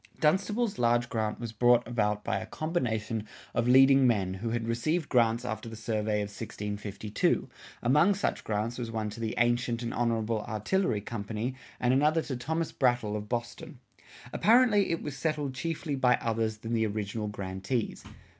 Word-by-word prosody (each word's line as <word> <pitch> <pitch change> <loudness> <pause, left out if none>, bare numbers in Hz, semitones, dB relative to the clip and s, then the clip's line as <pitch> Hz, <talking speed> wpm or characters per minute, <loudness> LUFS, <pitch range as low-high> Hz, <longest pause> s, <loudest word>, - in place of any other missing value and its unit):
"[56:3] - - -28
Dunstable's 195 - +1
large 120 0 +2
grant 110 -2 -2
was 115 -2 -5
brought 120 +2 +4
about 105 -3 0
by 95 - -1
a 110 - -7
combination 115 -8 -2 0.3
of 120 - +1
leading 135 +1 +7
men 100 -6 +1
who 105 +5 -4
had 115 0 -2
received 150 +8 0
grants 120 -1 +2
after 115 -1 -4
the 110 - -8
survey 110 -1 -1
of 105 - -3
1652; 105 0 -2 0.4
among 150 +11 +4
such 200 - -1
grants 110 +3 -2
was 120 -2 -3
one 110 -2 -3
to 110 - -9
the 110 -1 -2
Ancient 120 0 +1
and 115 - -3
Honorable 115 -2 0
Artillery 110 - 0
Company 110 +3 -4 0.3
and 125 0 +2
another 150 +4 +3
to 130 - -4
Thomas 160 +6 -2
Brattle 120 -5 +1
of 105 0 -5
Boston. 120 +2 -4 0.6
Apparently 220 -3 +4
it 165 - -1
was 145 -2 -5
settled 150 -2 -2
chiefly 155 +3 -3
by 130 -2 +4
others 110 -2 -1
than 115 +2 -5
the 110 -1 +2
original 105 +1 -3
grantees. 100 +3 -3
115 Hz, 170 wpm, -29 LUFS, 110-135 Hz, 0.6 s, leading